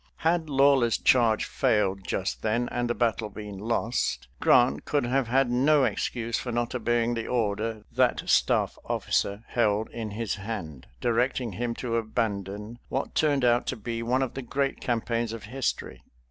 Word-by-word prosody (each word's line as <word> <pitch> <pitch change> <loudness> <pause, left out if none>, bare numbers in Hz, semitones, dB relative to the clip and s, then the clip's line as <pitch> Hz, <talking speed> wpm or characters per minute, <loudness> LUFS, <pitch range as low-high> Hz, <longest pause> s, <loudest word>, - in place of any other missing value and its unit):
Had 165 -1 +2
Lawler's 135 -4 +4
charge 115 -4 +3
failed 100 -3 0
just 95 - -2
then 115 +3 0
and 120 0 -1
the 120 - 0
battle 115 -2 0
been 105 -2 -8
lost, 115 - -1
Grant 70 +2 +4
could 145 -4 0
have 130 0 +1
had 130 +1 +2
no 140 +4 +4
excuse 115 -2 -1
for 125 - -4
not 120 +1 -1
obeying 120 -1 +1
the 115 -1 -3
order 110 -2 -1
that 125 +1 +1
staff - - +2
officer 100 +2 -1
held 110 -2 +1
in 115 -2 -5
his 110 +1 -3
hand, 95 - -6
directing 120 0 0
him 115 +4 -3
to 115 -2 -2
abandon 110 -1 -3
what 135 - -2
turned 145 -4 +2
out 120 0 +3
to - - -1
be 115 +1 -4
one 125 +3 +1
of 130 - -4
the 135 - -5
great 135 +2 -2
campaigns 115 -1 -1
of 115 - -7
history. 130 +5 -3
115 Hz, 165 wpm, -27 LUFS, 110-125 Hz, -, Lawler's